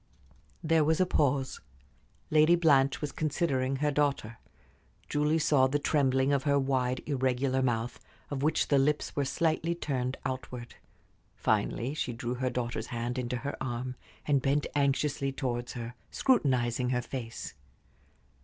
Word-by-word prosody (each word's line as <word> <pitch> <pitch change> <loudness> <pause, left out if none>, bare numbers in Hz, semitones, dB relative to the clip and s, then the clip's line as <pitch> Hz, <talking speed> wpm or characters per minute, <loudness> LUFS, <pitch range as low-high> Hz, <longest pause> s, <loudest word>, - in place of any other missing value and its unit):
There 160 -1 +3
was 160 +3 +2
a 185 - +4
pause. 140 -5 0 0.7
Lady 155 +2 +6
Blanche 140 -5 +3
was 150 - -3
considering 135 -4 0
her 150 +2 0
daughter. 140 -6 0 0.7
Julie 150 +2 +1
saw 145 -4 +4
the 140 +3 +1
trembling 135 -2 +2
of 140 - +2
her 140 0 +2
wide, 130 -2 0
irregular 130 -1 0
mouth, 120 -1 -1 0.3
of 140 -2 -2
which 155 +3 +1
the 140 - +4
lips 150 +2 0
were 140 - +1
slightly 165 +3 0
turned 130 -6 -2
outward. 125 -2 -5 0.6
Finally 110 +5 0
she 130 -5 -2
drew 120 +1 -3
her 130 +1 -1
daughter's 120 -1 -3
hand 120 +2 -3
into 125 0 -2
her 140 +3 -4
arm, 125 0 -3 0.3
and 140 -2 +2
bent 140 +3 +1
anxiously 140 0 +1
towards 120 -3 -3
her, 120 -1 -6 0.2
scrutinizing 125 - +2
her 125 -1 0
face. 120 -3 -6
135 Hz, 145 wpm, -30 LUFS, 125-145 Hz, 0.7 s, Lady